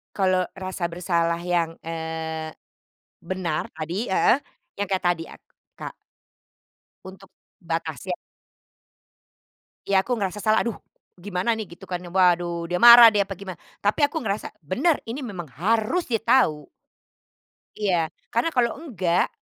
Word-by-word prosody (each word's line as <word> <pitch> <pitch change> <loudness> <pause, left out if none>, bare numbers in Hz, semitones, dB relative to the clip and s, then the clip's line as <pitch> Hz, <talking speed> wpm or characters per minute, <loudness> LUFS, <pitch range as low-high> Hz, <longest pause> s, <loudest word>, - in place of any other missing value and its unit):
Kalau 185 -2 +2 0.2
rasa 185 -1 -5
bersalah 170 -1 0
yang, 175 -2 0 0.2
eee, 160 -1 -4 0.7
benar 175 -3 -2
tadi, 170 +8 -3
heeh, 190 +6 +4 0.4
yang 205 - -1
kayak 190 -1 -1
tadi 175 -2 +1
ak - - -14 0.3
Kak. - - -7 1.1
Untuk 190 0 -12 0.3
batasnya. 165 0 -3 1.7
Iya 195 -1 +3
aku 245 - -1
ngerasa 200 0 -2
salah, 215 0 +3
"aduh! 235 -3 -3 0.4
Gimana 195 +3 -1
nih" 215 -4 -5
gitu 190 - -13
kan, 180 - -1 0.2
waduh, 175 -2 +2
dia 180 - 0
marah, 235 -1 +11
dia 205 -2 +2
apa 195 - -4
gimana, 185 -2 -8 0.3
tapi 215 +9 +3
aku 320 +1 -4
ngerasa 200 0 -2 0.2
benar 280 - +1
ini, 255 +5 -4
memang 185 -6 -6
harus 225 - +1
dia 225 -3 0
tahu. 155 - +3 1.1
Iya, 195 -4 +2 0.4
karena 235 +8 +2
kalau 240 -4 +2
enggak, 180 - 0
185 Hz, 135 wpm, -24 LUFS, 170-215 Hz, 1.7 s, marah